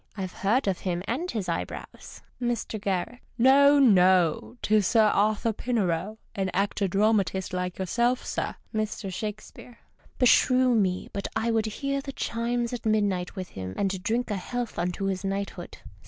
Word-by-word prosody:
I've 185 Hz, -2 st, -4 dB
heard 225 Hz, +3 st, +1 dB
of 190 Hz, -2 st, 0 dB
him 180 Hz, -1 st, -2 dB
and 310 Hz, +10 st, -2 dB
his 215 Hz, -, -3 dB
eyebrows. -, -, -6 dB, 0.2 s
Mr. 235 Hz, -3 st, -2 dB
G. 195 Hz, +5 st, -2 dB
— -, -, -37 dB
No, 280 Hz, +4 st, +6 dB
no, 180 Hz, -, +4 dB
'tis 210 Hz, -3 st, +3 dB
Sir 225 Hz, -2 st, +4 dB
Arthur 215 Hz, +2 st, +2 dB
Pinero, 210 Hz, -4 st, -1 dB, 0.2 s
an 195 Hz, -3 st, -1 dB
actor 200 Hz, +1 st, 0 dB
dramatist 195 Hz, -2 st, +1 dB
like 180 Hz, 0 st, -3 dB
yourself, 235 Hz, +7 st, 0 dB
sir. -, -, -3 dB, 0.2 s
Mr. 215 Hz, -2 st, -3 dB
Shakespeare. 215 Hz, +4 st, -7 dB, 0.2 s
— -, -, -30 dB
Beshrew 255 Hz, 0 st, +4 dB
me, 190 Hz, -5 st, 0 dB
but 200 Hz, -, -3 dB
I 225 Hz, +1 st, 0 dB
would 220 Hz, -1 st, +1 dB
hear 275 Hz, +5 st, -2 dB
the 275 Hz, 0 st, -7 dB
chimes 235 Hz, 0 st, -2 dB
at 245 Hz, -, -5 dB
midnight 205 Hz, -5 st, 0 dB
with 185 Hz, -2 st, -5 dB
him 95 Hz, -1 st, -7 dB
and 195 Hz, -2 st, -1 dB
drink 230 Hz, +3 st, -1 dB
a 205 Hz, -, -1 dB
health 240 Hz, +2 st, -4 dB
unto 180 Hz, +3 st, -2 dB
his 190 Hz, -1 st, -2 dB
knighthood. 195 Hz, -2 st, -4 dB
210 Hz, 165 wpm, -27 LUFS, 190-235 Hz, 0.2 s, No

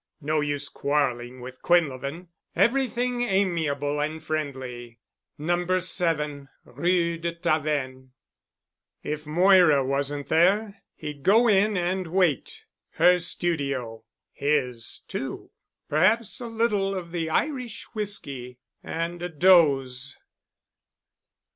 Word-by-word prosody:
No 155 Hz, 0 st, 0 dB
use 145 Hz, -1 st, -1 dB
quarreling 130 Hz, -4 st, -1 dB
with 130 Hz, +1 st, -10 dB
Quinlevin. 165 Hz, 0 st, 0 dB, 0.3 s
Everything 250 Hz, -1 st, +1 dB
amiable 165 Hz, -9 st, 0 dB
and 155 Hz, +2 st, -3 dB
friendly. 130 Hz, -6 st, -5 dB, 0.4 s
No. 175 Hz, +4 st, 0 dB
7 150 Hz, -6 st, -1 dB, 0.2 s
Rue 170 Hz, +4 st, 0 dB
de 170 Hz, 0 st, -3 dB
Tavennes. 150 Hz, -6 st, -1 dB, 0.9 s
If 150 Hz, 0 st, -4 dB
Moira 175 Hz, -4 st, +5 dB
wasn't 140 Hz, +1 st, -2 dB
there, 200 Hz, +5 st, +2 dB
he'd 150 Hz, -2 st, -7 dB
go 220 Hz, -, +5 dB
in 205 Hz, -1 st, +3 dB
and 180 Hz, +1 st, -1 dB
wait. 175 Hz, -5 st, 0 dB, 0.3 s
Her 180 Hz, 0 st, +5 dB
studio... 140 Hz, -10 st, -2 dB, 0.3 s
his 125 Hz, -6 st, -1 dB
too. -, -, -6 dB, 0.4 s
Perhaps 195 Hz, +8 st, +2 dB
a 240 Hz, -, -5 dB
little 210 Hz, -4 st, 0 dB
of 175 Hz, -3 st, -6 dB
the 165 Hz, -2 st, -2 dB
Irish 250 Hz, -, -2 dB
whisky 140 Hz, -, -5 dB, 0.3 s
and 170 Hz, +1 st, -4 dB
a 175 Hz, -, -3 dB
doze.... 140 Hz, -6 st, +3 dB
160 Hz, 105 wpm, -25 LUFS, 140-185 Hz, 0.9 s, Moira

